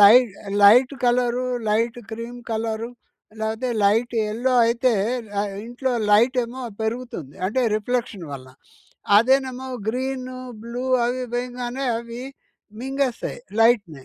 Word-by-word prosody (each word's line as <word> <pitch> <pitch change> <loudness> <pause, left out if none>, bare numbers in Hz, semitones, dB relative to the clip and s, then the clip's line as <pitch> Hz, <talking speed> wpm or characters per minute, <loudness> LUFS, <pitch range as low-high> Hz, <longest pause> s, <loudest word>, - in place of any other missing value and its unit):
లై 205 +4 +10 0.5
light 245 +7 +7
colour 245 0 +2 0.2
light 230 +3 +1
cream 230 +2 -6
colour 225 0 -2 0.5
లేతే 220 +3 -2 0.2
light 225 +4 +2
yellow 240 +5 0
అయితే 240 +1 +2 0.5
ఆహ్, 205 - -2 0.2
ఇంట్లో 250 +2 -2 0.2
లైటేమో 245 +3 +3 0.2
పెరుగుతుంది 220 - -4
అంటే 255 +6 0 0.2
రిఫ్లెక్షన్ 215 -4 -2
వల్ల. 130 -1 -8 0.7
అదేనేమో 260 +2 +2 0.2
గ్రీను 255 +1 -3 0.3
బ్లూ 240 +2 -5 0.2
అవి 250 +1 -1
వేయంగానే 250 +2 -3
అవి 235 +1 -7 0.6
మింగేస్తాయి 265 -2 -2 0.2
లైట్‍ని. 200 - +3
240 Hz, 105 wpm, -23 LUFS, 220-255 Hz, 0.7 s, లై